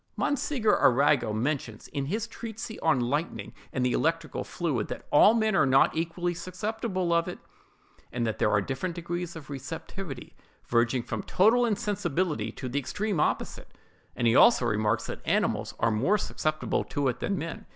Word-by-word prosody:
Monsieur 270 -5 +1
Arago 135 -2 +4
mentions, 115 -1 -2
in 140 -2 -3
his 215 +7 -1
treatise 225 -1 -7
on 160 -5 +3
lightning 145 +7 -2 0.2
and 125 -1 0
the 125 - +2
electrical 165 0 -1
fluid, 145 - -2
that - - -7
all 210 +9 +7
men 220 -2 +2
are 140 - +4
not 135 +1 +4
equally 170 +2 -1
susceptible 185 0 -2
of 170 0 +2
it, - - -5 0.7
and 120 -1 -1
that 110 - -2
there - - +3
are 105 -1 +3
different 135 - -3
degrees 175 0 -4
of 150 -3 -9
receptivity, 140 +1 -7 0.3
verging 120 +1 +1
from 110 -3 -4
total 235 +6 +3
insensibility 195 -7 -1
to 130 - -7
the 130 +3 -1
extreme 200 - -2
opposite; - - -2 0.4
and 120 - -1
he 115 +1 +4
also 180 - +6
remarks 110 0 +1
that - - -6
animals - - 0
are 115 - +2
more 130 - +2
susceptible 155 -5 -1
to 145 -2 -2
it 125 -1 -1
than 200 - -1
men. 165 0 -6
160 Hz, 170 wpm, -28 LUFS, 125-190 Hz, 0.7 s, all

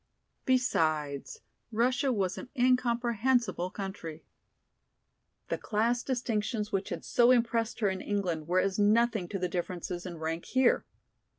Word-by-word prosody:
Besides, 155 - 0 0.3
Russia 250 +4 +2
was 195 -5 0
an 250 - -8
incomprehensible 240 -4 +2
country. 190 -5 -7 1.2
The - - -1
class 230 +3 +1
distinctions 225 -4 -2
which 195 -2 -1
had - - -5
so 240 0 +4
impressed 230 -2 +2
her 205 - +3
in 190 0 -3
England 180 -7 -2
were 180 +2 +3
as 195 +1 0
nothing 215 -2 +3
to 195 - -3
the 180 -1 -1
differences 175 0 -4
in 175 -2 -7
rank 160 +1 -3
here. 260 -1 +2
210 Hz, 130 wpm, -30 LUFS, 180-240 Hz, 1.2 s, so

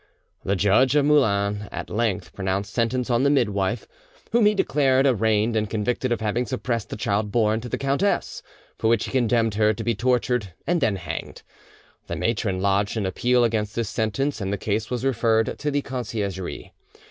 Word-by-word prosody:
The 100 - 0
judge 105 +8 +3
of 145 -1 +4
Moulins 105 -8 +2
at - - -6
length 105 -6 -1
pronounced 100 +1 -2
sentence 125 +2 0
on 120 +1 +3
the 140 - +3
midwife, 110 -5 0 0.4
whom 230 -3 +4
he 210 - +3
declared 135 -6 +2
arraigned 110 -2 +2
and 105 -1 0
convicted 120 +4 -1
of 120 - 0
having 115 +3 -1
suppressed 115 +1 -3
the - - -5
child 105 -1 -1
born 110 -1 +2
to 120 - -7
the - - -2
countess; 140 +9 0 0.4
for 110 - +1
which 115 -1 +2
he - - -6
condemned 120 -3 +2
her 105 +1 +2
to - - -5
be 120 - +1
tortured 125 -4 0
and 175 -1 +1
then 105 -6 +2
hanged. 85 -4 -6 0.6
The - - -3
matron 105 -5 -1
lodged 100 +2 +1
an 105 - -1
appeal 120 +6 +2
against 110 -2 -1
this 115 -3 -1
sentence, 110 +5 -1
and 95 0 -2
the 100 - -1
case 105 +2 -2
was 125 0 -3
referred 115 -3 +1
to 150 - -1
the 145 -1 -1
Conciergerie. 105 -7 -4
115 Hz, 185 wpm, -24 LUFS, 105-125 Hz, 0.6 s, of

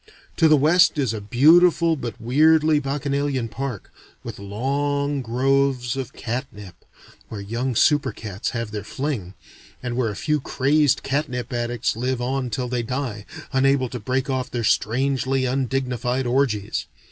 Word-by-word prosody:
To 160 - +5
the 155 -1 +6
west 160 +4 +4
is 130 -6 0
a 110 - -5
beautiful 165 - +5
but 125 -4 -6
weirdly 155 +5 +4
bacchanalian 140 -3 -2
park, 120 0 -5 0.3
with - - -7
long 140 +7 -1
groves 130 0 +1
of 135 -3 -4
catnip, 110 -5 -6 0.6
where 110 - -6
young 115 +5 -3
super 150 +5 +3
cats 100 -3 -5
have 115 -3 -4
their 105 -2 -5
fling, 115 -7 -4 0.5
and 125 -1 -3
where 120 -3 0
a 105 - -5
few 150 +7 0
crazed 140 +1 +2
catnip 135 -3 -2
addicts 120 -1 -1
live 125 +2 -1
on 130 +1 -2
till 125 +3 -2
they 125 0 -1
die, 115 -3 -4 0.3
unable 135 -1 +2
to 125 - -6
break 130 +5 -1
off 130 -2 -2
their 120 -1 -3
strangely 130 +4 +1
undignified 130 -1 -1
orgies. 120 -5 0
130 Hz, 145 wpm, -23 LUFS, 120-140 Hz, 0.6 s, the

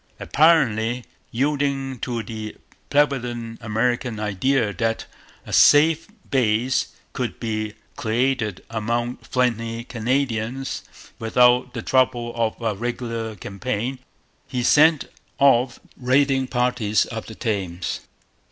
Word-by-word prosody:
Apparently 125 -7 +3 0.2
yielding 135 0 -1
to 115 -1 -3
the 110 -2 -6 0.3
prevalent 120 -6 0
American 115 +1 -1
idea 105 +2 +1
that 115 +5 -1 0.4
a - - -8
safe 155 +2 +6 0.2
base 125 0 +2 0.3
could 125 -3 -3
be 110 -2 -3 0.2
created 115 -3 0
among 120 +2 -1
friendly 115 -2 -1
Canadians 125 +1 -2 0.4
without 125 +2 +3
the 115 - -4
trouble 120 -2 +1
of 115 -2 -1
a 115 -2 -1
regular 115 0 -4
campaign, 115 +6 -4 0.5
he 125 -1 -2
sent 155 +3 +5 0.3
off 125 -3 +4 0.2
raiding 135 +1 +2
parties 125 -4 +1
up 110 -1 -5
the 110 - -9
Thames. 95 -6 -2
120 Hz, 105 wpm, -23 LUFS, 110-130 Hz, 0.5 s, safe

